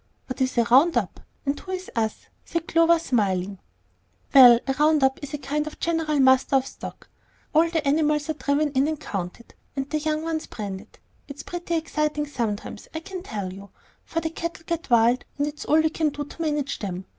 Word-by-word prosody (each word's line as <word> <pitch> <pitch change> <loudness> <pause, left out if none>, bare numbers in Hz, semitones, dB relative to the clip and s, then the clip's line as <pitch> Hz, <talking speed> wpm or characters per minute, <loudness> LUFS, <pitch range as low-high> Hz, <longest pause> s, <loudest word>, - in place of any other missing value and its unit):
"What 255 +1 -6
is 255 -1 0
a 235 - +5
'round 270 +9 +5
up' - - -2 0.3
and 280 +1 -1
who 375 - -7
is 370 0 -5
'us'?" 220 -2 -1 0.2
said 335 -1 -3
Clover, 330 0 +4
smiling. 200 - -1 0.7
"Well, 245 -4 +9
a 270 - 0
round 305 -1 +4
up 265 0 +2
is 290 +1 -5
a - - -3
kind 295 +2 -2
of 310 - -9
general 325 -3 0
muster 260 0 +4
of 265 - +4
the - - -8
stock. - - -10 0.5
All 325 +2 +4
the 320 -3 -1
animals 300 +1 +2
are 315 - 0
driven 290 0 0
in 270 +1 +2
and 310 -2 -2
counted, 195 -2 -6 0.2
and 270 -1 -2
the 305 - +1
young 310 0 -1
ones 320 -1 -3
branded. 200 -4 -7 0.3
It's 280 0 -8
pretty 345 -1 -4
exciting 305 -2 -1
sometimes, 225 -7 -4
I - - -1
can 370 +2 -7
tell 205 - -5
you, 200 +1 -11 0.3
for 330 - -3
the 320 - -3
cattle 335 0 -5
get 335 -3 -3
wild, 240 +1 +4
and 285 - +1
it's 295 0 -6
all 310 - +4
we 315 0 +2
can 315 -1 +1
do 290 0 -5
to 310 - -10
manage 295 -3 -1
them. 190 -2 -5
290 Hz, 210 wpm, -24 LUFS, 250-315 Hz, 0.7 s, Well